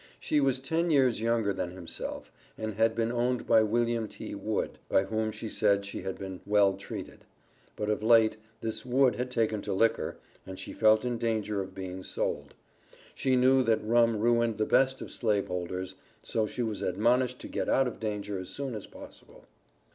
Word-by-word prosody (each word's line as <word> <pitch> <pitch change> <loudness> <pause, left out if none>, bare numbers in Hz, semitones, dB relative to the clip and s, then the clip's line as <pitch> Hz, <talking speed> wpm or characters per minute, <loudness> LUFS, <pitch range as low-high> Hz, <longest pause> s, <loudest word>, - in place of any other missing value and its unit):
She 150 - +1
was 135 -2 +2
ten 160 +6 -1
years 130 -7 +3
younger 115 -3 +1
than 90 - -3
himself, 90 -2 -7 0.3
and 110 0 -3
had 110 +2 +2
been 115 0 0
owned 120 0 0
by 110 - +5
William 115 +1 +1
T. - - -8
Wood, - - -3
by 95 - +4
whom 110 +1 -1
she 110 - -7
said 100 -2 +2
that - - -10
she 100 - -6
had 95 - -4
"been 95 -2 -7
well 100 -1 +4
treated." 100 - -8 0.5
But 105 - -3
of 105 0 0
late, 110 -1 +5 0.2
this 110 -1 -4
Wood 130 0 +3
had 125 +1 -2
taken 110 -4 0
to 100 - -3
liquor, 115 +4 +1 0.3
and 95 0 -8
she - - -7
felt 110 +1 +4
in 120 -2 -1
danger 105 -3 -1
of 95 0 -8
being 95 -1 -6
sold. - - -3 0.6
She 130 -1 +1
knew 130 +1 +5
that 115 -3 +1
rum 115 0 +3
ruined 115 0 +2
the 110 - +1
best 130 +3 +3
of - - -10
slave 105 -4 0
holders, 90 +1 -4 0.3
so 110 -1 -1
she 125 - -3
was 105 -4 -3
admonished 120 +7 +1
to - - -7
get - - -3
out 135 -1 +3
of 120 - -6
danger 105 -2 -3
as 95 - -7
soon 140 -3 -4
as 105 -3 -6
possible. - - -14
110 Hz, 195 wpm, -29 LUFS, 100-120 Hz, 0.6 s, by